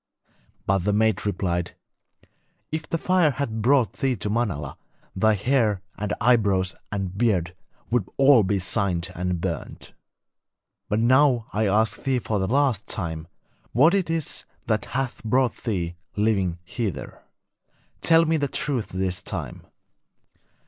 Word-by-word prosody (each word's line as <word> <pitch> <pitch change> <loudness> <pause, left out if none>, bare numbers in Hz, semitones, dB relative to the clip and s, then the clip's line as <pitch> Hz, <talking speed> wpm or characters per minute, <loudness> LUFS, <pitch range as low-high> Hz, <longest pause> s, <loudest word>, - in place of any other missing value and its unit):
But 95 0 +2
the 100 +3 0
maid 110 -1 +2
replied: 90 -3 -2 1.0
'If 155 0 -4
the 165 - 0
fire 180 -1 +3
had 125 -6 -3
brought 125 -3 +3
thee 135 -2 0
to 105 0 -3
Manala, 85 - -2 0.4
thy 110 +3 +3
hair 105 -3 +1
and 105 +1 -3
eyebrows 100 -6 +3 0.2
and 95 -3 -3
beard 95 -6 +1 0.4
would 115 -6 +1
be - - -21
all 135 -4 +6
singed 90 -2 -1
and 90 -1 -2
burnt. - - -5 1.0
But 105 +2 +1
now 130 -1 +4
I 110 +1 +1
ask 110 +3 +1
thee 135 -1 +1
for 110 -3 -1
the 95 - 0
last 130 -4 +1
time 80 -4 -4 0.5
what 150 - +5
it 195 -4 +1
is 165 -3 -2 0.2
that 110 -2 0
hath 130 -1 -3
brought 125 +2 +2
thee, 90 -7 -1 0.2
living, 100 -5 +1
hither. 90 - -5 0.8
Tell 165 0 +5
me 160 0 +2
the 145 -2 0
truth 130 -4 -2
this 95 -1 -2
time.' - - -5
110 Hz, 140 wpm, -24 LUFS, 95-130 Hz, 1.0 s, all